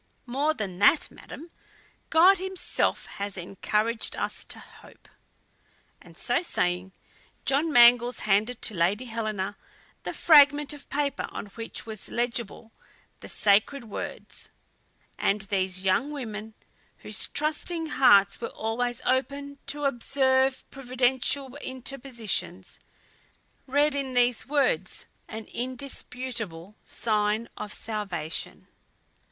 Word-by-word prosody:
"More 280 +5 0
than 190 -7 -5
that, 205 +10 +5
madam, 330 +4 -11 0.6
God 365 +4 +6
himself 380 0 -1
has 200 -1 -5
encouraged 210 +5 -1
us - - -3
to - - -8
hope." - - -16 0.9
And - - -16
so - - 0
saying, 180 - -1 0.5
John 290 +4 +2
Mangles 245 -1 +6
handed 215 +4 +1
to 220 - +2
Lady 190 +7 +1
Helena 215 -4 -3 0.4
the - - -4
fragment 290 -2 +6
of 290 - -13
paper 285 -1 -1
on - - -6
which 230 -1 -5
was 215 -3 -6
legible 235 -2 -2 0.5
the - - -9
sacred 215 +7 +2
words; - - -6 0.7
and 200 +1 +1
these 190 -2 -1
young 195 +9 +2
women, 220 -6 -6 0.5
whose - - -1
trusting 315 +2 -1
hearts 200 -8 +5
were 230 - -2
always 240 +2 -2
open 280 +2 -1
to 290 0 +1
observe 265 0 +2
Providential 260 +1 +1
interpositions, 245 -9 -3 0.9
read 290 +3 +3
in 270 -2 -3
these 245 0 +2
words 295 - 0 0.2
an 220 0 -7
indisputable 245 -7 -5
sign 215 0 0
of 210 - -6
salvation. 200 -9 -4
245 Hz, 110 wpm, -27 LUFS, 210-280 Hz, 0.9 s, God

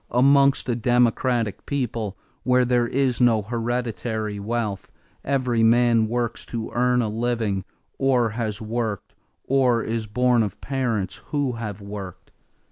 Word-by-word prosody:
"Amongst 140 +3 +4
a 120 - +1
democratic 120 -1 +1
people 115 -7 -2 0.2
where 125 0 +3
there 120 -1 +2
is 130 -1 0
no 115 -3 +4
hereditary 115 -2 -3
wealth, 105 -2 -3 0.3
every 125 -4 0
man 115 0 +4
works 120 0 -2
to 115 -2 -5
earn 125 0 +2
a - - -1
living, 110 -3 -1 0.3
or 125 -4 +2
has 110 -2 -3
worked, 110 -2 -3 0.3
or 125 -3 +2
is 110 -1 -3
born 125 +2 +2
of 100 -2 -3
parents 115 -8 -2
who 145 -3 0
have 110 -4 -6
worked. 100 -3 -8
120 Hz, 130 wpm, -23 LUFS, 110-125 Hz, 0.3 s, Amongst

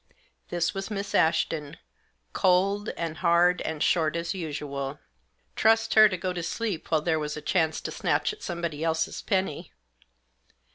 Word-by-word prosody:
This 175 -1 0
was 195 +1 -5
Miss 200 -1 -4
Ashton, 160 -2 +1 0.6
cold, 195 +3 +2
and 165 -1 -3
hard, 175 +1 +3
and 160 -2 -2
short 160 -2 +2
as 170 +2 -2
usual. 145 -5 -4 0.6
Trust 225 +1 +3
her 215 -1 +8
to 185 - -3
go 185 +1 -2
to 175 - -4
sleep 195 +1 -3
while 160 -2 +2
there 160 0 +1
was 150 0 -4
a - - -3
chance 160 -3 +1
to - - -5
snatch - - 0
at 425 - -14
somebody 170 -3 -4
else's 160 0 -1
penny 190 -6 -2
170 Hz, 155 wpm, -27 LUFS, 160-190 Hz, 0.6 s, her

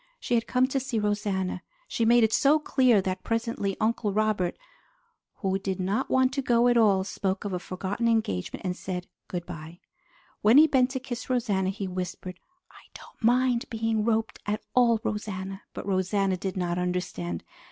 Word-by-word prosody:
She - - -3
had 230 -1 +2
come 250 0 +3
to 270 - 0
see 255 -3 -3
Rosanna. 205 -3 -1 0.3
She 230 - 0
made 235 +1 +5
it 220 0 +2
so 290 +2 +5
clear 255 -8 +3
that 185 0 -2
presently 230 -4 -2
Uncle 220 -1 0
Robert, 210 -3 0 0.8
who 195 -3 -1
did 190 -1 -3
not 200 +8 -1
want 260 0 +3
to 275 - 0
go 240 -2 +3
at 240 - +4
all, 205 -5 +4
spoke 195 0 -3
of 200 - -3
a 180 - -1
forgotten 190 +6 -3
engagement 215 - -1
and 180 -1 -1
said 180 -1 -5 0.2
good 175 -1 -4
by. 165 0 -9 0.6
When 220 +5 +6
he 310 - +9
bent 265 -4 +3
to 260 0 -3
kiss 250 -1 -6
Rosanna, 205 -7 +1
he 195 0 -4
whispered, 180 0 -5 0.3
"I - - -17
don't - - -14
mind 245 +1 +3
being 225 -1 0
roped 220 0 0
at 210 +1 -2
all, 235 -3 +4
Rosanna!" 195 -2 -4
but - - -7
Rosanna 195 0 +1
did 190 +1 -4
not 175 -1 -1
understand. 180 - -3
210 Hz, 180 wpm, -27 LUFS, 185-235 Hz, 0.8 s, he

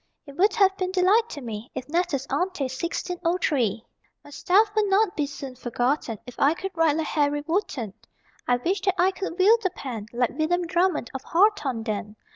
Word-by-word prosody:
It 280 -2 -12
would 390 +6 +3
have 385 -2 +4
been 370 -1 -2
delight 390 +5 +3
to 290 - -7
me 225 -1 -6
If 255 - -5
natus 315 -4 0
ante 365 -5 -1
1603. 295 - -1 0.4
My 290 - -14
stuff 410 +8 +3
would 425 -1 +2
not 395 0 +2
be 295 -2 0
soon 275 -2 -7
forgotten 245 -1 -1
If 250 - -11
I 290 +4 +4
could 385 +2 -5
write 325 -3 +2
like 320 - -1
Harry 290 -1 0
Wotton. 300 - -2 0.5
I 245 - +3
wish 360 +11 -1
that 385 -2 +1
I 370 +2 +4
could 380 -2 -5
wield 435 +5 +5
the 375 - +1
pen 240 - -7
Like 245 0 0
William 350 +3 0
Drummond 350 -5 0
of 265 - -5
Hawthornden. 250 - 0
325 Hz, 185 wpm, -25 LUFS, 255-375 Hz, 0.5 s, wield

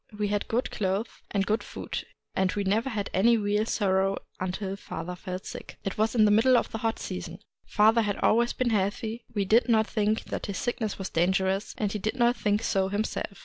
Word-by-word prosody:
We 210 -1 0
had 205 0 -1
good 240 +3 -1
clothes 200 +2 -1 0.2
and 195 -1 0
good 215 +3 +1
food; - - -6 0.3
and 190 -1 +1
we 205 - -1
never 215 +6 +1
had 210 -5 -3
any 230 +5 +4
real 210 +1 0
sorrow 195 -2 +1 0.2
until 190 +1 -3
father 180 -2 -6
fell 185 +1 -5
sick. - - -8
" - - -41
It 195 - -2
was 220 +1 +1
the 215 -3 +5
middle 245 +4 +5
of - - -1
the 225 - -4
hot 225 +1 0
season. - - -6 0.3
Fa 215 +1 +5
ther 230 - +3
had 205 -2 -1
always 235 +2 +3
been 250 -2 0
healthy: 220 +3 -1
we 200 -1 +1
did 230 +5 +4
not 220 -1 +4
think 215 0 0
that - - -5
his 200 - -3
sickness 235 -4 -2
was 195 - -4
dangerous, 190 +3 +1
and 210 -2 -1
he 210 - -3
did 215 +4 -2
not 240 -1 +3
think 210 -1 0
so 195 -4 +1
himself. 205 0 -3
210 Hz, 220 wpm, -27 LUFS, 195-225 Hz, 0.3 s, the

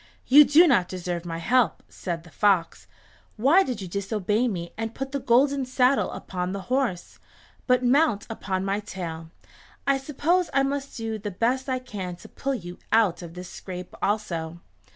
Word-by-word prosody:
"You 290 +3 +8
do 325 +5 +6
not 185 - +3
deserve 175 -2 -4
my 165 -1 -4
help," 235 +2 +2
said 170 -3 -5
the 170 - -16
fox. 185 +1 +1 0.5
"Why 280 - +5
did 250 - -3
you - - -6
disobey 205 +4 0
me 175 -6 -4
and 225 0 -4
put 270 0 -4
the 280 - -2
golden 270 +3 +3
saddle 255 +1 +2
upon 180 0 -4
the 200 - -4
horse? 250 -10 -1 0.5
But 250 -1 +3
mount 250 -4 +3
upon 190 -4 -3
my 195 +1 0
tail. 170 -6 -6 0.6
I 275 -1 +2
suppose 315 +6 0
I 275 - +4
must 275 0 -3
do 225 -1 -3
the 205 0 -4
best 250 +7 -1
I 260 - +1
can 195 -8 -6
to 175 - -14
pull 275 0 -3
you 175 -5 -8
out 215 -7 +3
of 170 -1 -9
this 180 0 -8
scrape 180 -1 -8
also." 170 -6 -2
215 Hz, 175 wpm, -25 LUFS, 180-265 Hz, 0.6 s, You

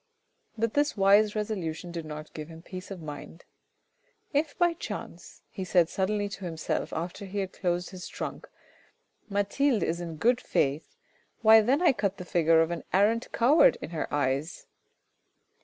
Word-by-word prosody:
But 225 0 0
this 290 -4 +1
wise 205 +2 +5
resolution 180 -6 -3
did 170 -2 -5
not 155 0 -8
give 155 -1 -7
him 165 0 -12
peace 185 0 -8
of 185 -4 -8
mind. 150 +2 -9 0.4
" - - -42
If 300 -2 -14
by 350 -1 +3
chance," 335 - -8
he 190 - -5
suddenly 190 +3 +1
said 200 - -8
to 195 - -7
himself 160 -2 -3
after 175 +4 -5
he 195 +1 -7
had 190 -2 -2
closed 175 -1 -2
his 185 -2 -8
trunk, - - -6 0.4
" - - -42
Mathilde 205 +3 +1
is 170 +2 -1
in 165 -2 -5
good 240 +10 +2
faith, 145 - -1 0.5
why 220 0 +8
then 270 +10 +2
I 345 - +6
cut 200 -4 -1
the 180 - -7
figure 165 -3 +4
of 165 - -3
an 170 - -4
arrant 215 +5 +2
coward 270 +7 +5
in - - -7
her 160 - -4
eyes. 140 +2 -1
190 Hz, 175 wpm, -28 LUFS, 165-215 Hz, 0.5 s, why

